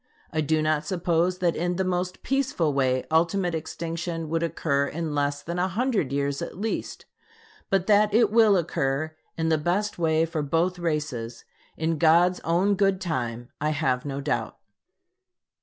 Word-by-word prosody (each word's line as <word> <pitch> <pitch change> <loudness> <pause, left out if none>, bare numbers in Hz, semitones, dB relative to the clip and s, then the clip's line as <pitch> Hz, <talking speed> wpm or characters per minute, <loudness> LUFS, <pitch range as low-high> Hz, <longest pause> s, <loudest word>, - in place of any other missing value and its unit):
I 155 - +1
do 155 +1 +1
not 155 -1 +1
suppose 175 -1 0
that 175 -2 +1
in 175 +2 -1
the 190 - 0
most 180 0 -2
peaceful 260 - 0
way 130 -2 +1
ultimate 170 +2 +2
extinction 165 0 -4
would 165 +1 0
occur 145 -4 0
in 160 -1 -4
less 145 0 -1
than 170 +2 -4
a 180 - +2
hundred 210 - 0
years 140 0 -1
at - - -6
least; 220 +3 -4 0.6
but 195 -2 +2
that 210 0 +4
it 220 0 +4
will 220 -3 +5
occur 155 -2 -1 0.2
in 160 0 0
the 160 -1 +2
best 180 +6 -1
way 160 -1 +2
for 165 -1 -3
both 165 +5 0
races, 145 -8 -3 0.3
in 160 -1 -1
God's 175 +2 +4
own 180 +5 +2
good 195 -1 +2
time, 120 -9 -3
I 150 - +1
have 135 -5 0
no 140 -1 -4
doubt. 140 - -2
165 Hz, 165 wpm, -26 LUFS, 150-180 Hz, 0.6 s, will